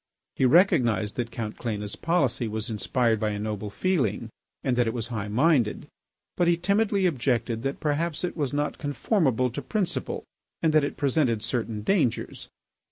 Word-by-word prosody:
He 130 - +2
recognised 125 - +3
that 120 -1 -2
Count 110 -2 -5
Cléna's 105 -4 -3
policy 140 -9 +1
was 110 +1 -3
inspired 115 +1 +1
by 110 0 0
a 105 - -3
noble 105 0 -4
feeling 115 - -1 0.3
and 130 -2 +1
that 120 -1 +2
it 115 - -2
was 115 -1 -2
high 110 -4 -3
minded, 125 0 +2 0.5
but 175 - +3
he 170 0 +4
timidly 200 +2 +1
objected 120 -7 0
that 135 +2 -3
perhaps 155 +2 -1
it 180 - -2
was 145 -5 -1
not 145 +1 -2
conformable 135 - +1
to - - -5
principle, 200 -6 -2 0.4
and 160 -2 +1
that 155 -1 +5
it 145 - -3
presented 130 -6 +1
certain 115 -2 -2
dangers. 155 - 0
125 Hz, 165 wpm, -26 LUFS, 110-160 Hz, 0.5 s, that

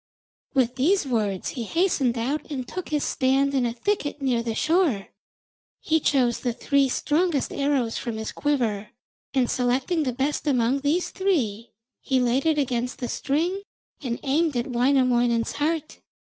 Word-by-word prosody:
With 255 -1 +2
these 340 +7 +2
words 210 -7 -1
he 250 - -5
hastened 270 - +1
out 270 +7 -2
and 260 -4 -4
took 370 - -6
his 300 -1 0
stand 275 +1 +1
in 255 -3 +2
a 230 - -3
thicket 295 - -2
near 255 -4 +1
the 230 -1 -3
shore. 315 - +1 0.7
He 320 0 +1
chose 255 -5 +2
the 245 -2 -1
three 275 +2 +2
strongest 305 +2 0
arrows 275 -5 0
from 230 -2 -4
his 220 0 -4
quiver, 230 -8 -1 0.5
and 255 -2 +3
selecting 255 +8 0
the 265 -4 0
best 275 +5 -2
among 255 -1 +2
these 300 +6 0
three, 240 - -1 0.3
he 265 -2 +1
laid 250 +4 +1
it 315 -1 +3
against 250 -3 -1
the 245 - -4
string 335 +8 -1 0.4
and 245 -4 -3
aimed 295 0 +1
at 240 - 0
Wainamoinen's 245 -2 +2
heart. 310 +1 -2
265 Hz, 160 wpm, -25 LUFS, 240-295 Hz, 0.7 s, and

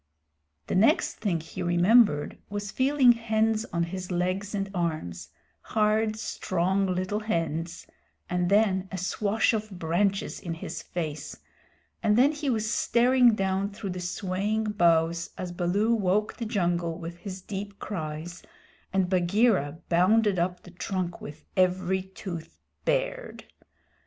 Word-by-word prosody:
The - - -4
next 200 +5 +3
thing 190 -6 0
he 165 - -8
remembered 175 -1 +4
was 205 0 -4
feeling 265 -1 +5
hands 225 -1 +1
on 170 0 0
his 185 +2 -5
legs 185 +3 -1
and 195 -1 -1
arms 155 - -3 0.3
hard, 215 0 +1
strong, 190 -2 0
little 185 +3 -1
hands 165 -5 -2 0.4
and 180 0 0
then 195 -2 +3
a 190 - -4
swash 205 +5 +1
of 215 -1 -2
branches 190 +2 -1
in 170 -4 -5
his 160 0 -6
face, 155 -4 -5 0.6
and 210 0 +3
then 270 +4 +6
he 295 -2 -3
was 220 -2 0
staring 245 -1 +4
down 195 0 0
through 200 -1 -6
the 180 - -5
swaying 200 +4 -1
boughs 170 -3 +2
as 180 -1 -4
Baloo 190 +6 +1
woke 210 -1 +1
the 235 - -4
jungle 175 -5 0
with 170 0 -7
his 190 0 -7
deep 200 0 -6
cries 160 -2 -5 0.5
and 190 -1 +2
Bagheera 180 - +2
bounded 195 +3 +3
up 180 +1 -1
the 180 - -13
trunk 180 0 -3
with 150 +2 -10
every 185 0 +2
tooth 180 -3 -8 0.3
bared. - - -1
190 Hz, 135 wpm, -27 LUFS, 175-215 Hz, 0.6 s, then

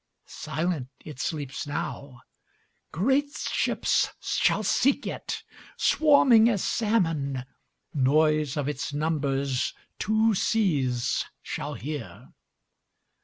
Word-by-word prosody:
Silent 155 -3 -3 0.2
it 150 -5 -9
sleeps 145 -1 -3
now; 140 -3 -5 0.7
Great 265 - +1
ships - - +1
shall 215 - +1
seek 275 +7 +2
it, - - -5 0.3
Swarming 260 -7 +5
as 205 -6 0
salmon; 165 - 0 0.5
Noise 150 +1 +2
of 145 -2 -1
its 145 0 -3
numbersTwo 150 - 0
seas 140 - +1 0.2
shall - - -4
hear. 145 -2 -7
155 Hz, 85 wpm, -26 LUFS, 140-215 Hz, 0.7 s, Swarming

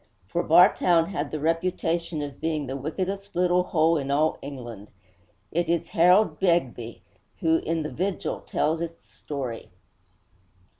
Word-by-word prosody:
For - - 0
Bartown 170 -1 +5
had 150 -7 -3
the 155 - -4
reputation 165 0 -1
of 145 -1 -8
being 155 -3 -1
'the 135 +1 -5
wickedest 190 +7 -4
little 180 0 +3
hole 160 -1 +2
in 140 -1 -4
all 150 +3 +1
England.' 120 -7 -8 0.6
It 170 0 0
is 170 0 0
Harold 180 +5 +4
Begbie 125 - 0 0.3
who, 160 0 +2
in 165 0 -2
The 150 - -5
Vigil, 190 +2 -2
tells 160 +2 -1
its 165 0 -7
story. 125 -7 -6
165 Hz, 140 wpm, -26 LUFS, 145-175 Hz, 0.6 s, Bartown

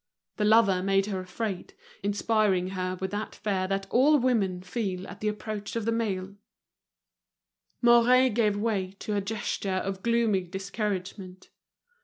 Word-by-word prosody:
The 210 - +1
lover 210 -4 +5
made 195 +1 +2
her 200 -2 -3
afraid, 185 +1 -5 0.3
inspiring 205 -2 +1
her 185 -1 -3
with 190 0 -3
that 205 +1 -4
fear 190 -3 -1
that 195 0 -1
all 290 +5 +5
women 210 -9 +1
feel 190 -2 -3
at 180 - -10
the 215 - -2
approach 210 0 -4
of 230 -2 -2
the 230 - +1
male. 200 -4 -2 1.5
Mouret 240 +2 +6
gave 210 -2 +2
way 205 -4 -1
to 210 - -3
a 200 - +1
gesture 200 -1 -3
of 190 0 -3
gloomy 230 -4 +2
discouragement. 190 0 -5
200 Hz, 145 wpm, -27 LUFS, 190-225 Hz, 1.5 s, Mouret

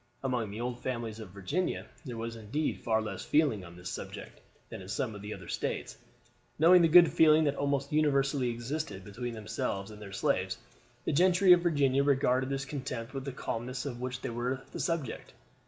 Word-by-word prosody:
Among 125 -5 -1
the 105 +2 -6
old 120 0 -3
families 115 -3 -4
of 110 -4 -8
Virginia 100 - -2 0.2
there 120 -4 -5
was 115 0 -4
indeed 115 +8 -2
far 110 -1 +1
less 110 - -5
feeling 145 -10 +2
on 85 -1 -11
this 90 0 -7
subject - - -8 0.3
than - - -7
in 95 - -10
some 120 0 -2
of 105 - -8
the 105 +1 -7
other 95 -3 -11
States. - - -3 0.6
Knowing 175 +3 +7
the 165 - +6
good 170 +1 +7
feeling 155 0 +6
that 145 -2 +2
almost 140 -1 -1
universally 140 -4 +2
existed 120 - -4
between 120 +3 -5
themselves 110 -2 -3
and 105 0 -11
their 100 -2 -8
slaves, 100 - 0 0.5
the - - 0
gentry 180 +3 +6
of 175 - +4
Virginia 140 -6 +3
regarded 130 -2 +2
with 135 0 -2
contempt 130 -4 -5
the 140 - -4
calumnies 125 0 -4
of 125 -3 -5
which 125 0 -4
they - - -3
were 125 +3 -2
the - - -6
subject. 165 -9 -3
130 Hz, 190 wpm, -31 LUFS, 110-145 Hz, 0.6 s, Knowing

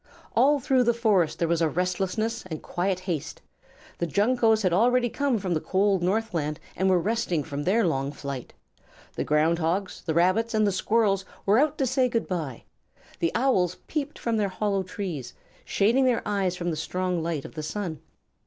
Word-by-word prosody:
All 280 +5 +4
through 255 -1 +2
the 235 0 +3
forest 205 -9 +2
there 170 - 0
was 170 0 +1
restlessness 185 +6 -1
and 160 -4 -6
quiet 185 +1 -1
haste. 175 -6 -4 0.6
The 170 - 0
Juncoes 220 - +2
had 185 -2 +2
already 240 +5 +3
come 280 -4 +1
from 190 -3 -2
the 160 - +1
cold 195 -1 +1
northland 175 -6 -1 0.2
and 190 0 +1
were 185 - +4
resting 190 -4 0
from 145 -1 -5
their 210 +4 +3
long 135 -4 0
flight. 140 -3 -6 0.6
The - - -2
Ground 155 +3 +2
Hogs, 180 +4 -1
the 160 -3 -2
Rabbits, 215 +7 +2
and 215 0 +3
the 200 - +2
Squirrels 195 0 +1 0.2
were 205 +4 +4
out 305 +1 +2
to 270 - +1
say 260 0 +2
good 230 -1 -1
by. 155 -10 -4 0.6
The 165 - +1
Owls 185 -9 +2
peeped 295 -1 -3
from 230 -1 -1
their 205 -2 +1
hollow 195 +1 -1
trees, 185 - -5 0.3
shading 235 +7 +2
their 245 -2 +1
eyes 195 -3 0
from 175 -1 -2
the - - -2
strong 180 +2 -2
light 160 -4 -3
of - - -9
the 155 - -5
sun. 160 0 -4
190 Hz, 185 wpm, -26 LUFS, 170-225 Hz, 0.6 s, All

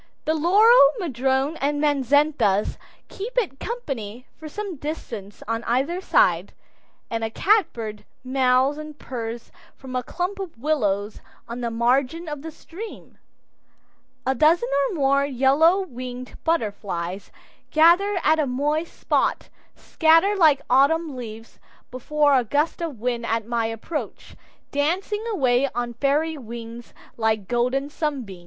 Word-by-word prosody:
The 315 - +2
laurel, 355 - +6
madrone, 270 - 0
and 290 +1 -1
manzanitas 285 -7 +2 0.3
keep 455 +6 -7
it 375 - 0
company 255 - -5
for 315 -1 -9
some 395 0 -6
distance 230 -9 -7
on 230 +1 -2
either 275 +10 0
side, 180 - +2 0.6
and 225 0 -2
a 225 - -1
catbird 230 - 0 0.2
mews 260 +2 +2
and 305 -1 -9
purrs 235 -3 -6 0.2
from 260 -1 -9
a 250 - +1
clump 365 +9 -4
of 370 -9 -7
willows 215 -7 -1 0.3
on 235 +1 -6
the 235 - -1
margin 255 +8 0
of 295 -2 -5
the 320 - -6
stream. 350 +7 -11 1.1
A 265 - +2
dozen 305 -2 +3 0.2
or - - -4
more 275 -2 +2
yellow 280 +7 +3
winged 250 -5 -8
butterflies 200 - -2 0.4
gathered 350 +6 +4
at 315 +1 +3
a 300 - +1
moist 295 +6 -2
spot, - - 0 0.3
scatter 330 +5 +3
like 315 -7 +4
autumn 290 +3 +3
leaves 225 -2 -9 0.3
before 290 +3 +1
a 255 - +3
gust 290 +9 0
of 310 -9 -4
wind 240 0 -2
at 225 -1 -1
my 230 -1 -1
approach, 225 +8 -6 0.4
dancing 365 +9 -1
away 265 - +2
on 240 0 -2
fairy 290 +5 0
wings 235 0 -9 0.3
like 220 -3 0
golden 250 +4 0
sunbeams. 275 - -4
275 Hz, 135 wpm, -23 LUFS, 235-320 Hz, 1.1 s, laurel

